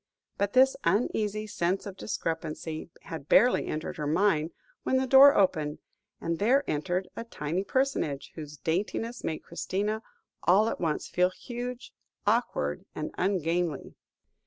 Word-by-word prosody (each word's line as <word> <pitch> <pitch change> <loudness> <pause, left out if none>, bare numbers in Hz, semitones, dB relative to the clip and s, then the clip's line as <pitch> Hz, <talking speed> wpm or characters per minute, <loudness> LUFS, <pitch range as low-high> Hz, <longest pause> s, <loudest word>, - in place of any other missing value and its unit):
But 200 0 0
this 265 +1 +6
uneasy 210 +2 0
sense 190 -2 -1
of 200 -2 -6
discrepancy 160 -4 -4
had 160 -3 -8
barely 245 +6 +5
entered 155 +1 -4
her 150 - -2
mind, 165 -1 +2 0.3
when 260 - +1
the 260 - +1
door 270 +2 +8
opened, 155 -6 +2 0.4
and 165 0 -2
there 255 +7 +3
entered 175 +5 -1
a - - -4
tiny 175 -5 -3
personage, 260 - -1
whose 150 -2 -8
daintiness 210 - -2
made 160 - -3
Christina 205 +5 -2 0.4
all 205 +5 +4
at - - -4
once 160 -3 -1
feel 180 0 +2
huge, 245 +5 -7 0.3
awkward, - - 0
and - - -4
ungainly. 175 -4 0
185 Hz, 135 wpm, -28 LUFS, 160-220 Hz, 0.4 s, door